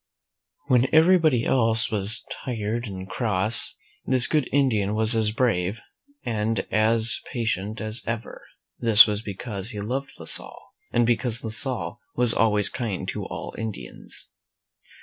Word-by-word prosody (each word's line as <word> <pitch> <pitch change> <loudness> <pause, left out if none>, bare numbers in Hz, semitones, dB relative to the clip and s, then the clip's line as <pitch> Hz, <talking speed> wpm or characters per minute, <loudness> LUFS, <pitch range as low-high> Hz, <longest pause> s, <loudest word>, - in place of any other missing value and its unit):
When 130 -2 +3
everybody 160 -6 +4
else 115 -3 +2
was 105 +1 0
tired 115 -1 -4
and 95 -2 -8
cross, 110 +1 +2 0.3
this 130 -2 +2
good 150 -5 0
Indian 110 -7 +1
was 110 +1 +6
as 110 -1 +3
brave 105 -4 -1 0.4
and 110 -1 -1
as 110 +1 +2
patient 110 -3 -3
as 110 +1 -4
ever. 115 -1 -5 0.4
This 115 -3 +8
was 105 -1 -3
because 100 0 -4
he 105 - -5
loved 130 +7 -4
La - - -10
Salle, - - -1 0.2
and 120 0 +2
because 120 0 0
La 110 - -4
Salle 115 -9 -1 0.2
was 120 -1 +3
always 105 -3 +1
kind 115 -8 -4
to - - -5
all - - -7
Indians. 110 -3 -7
115 Hz, 140 wpm, -24 LUFS, 105-120 Hz, 0.4 s, This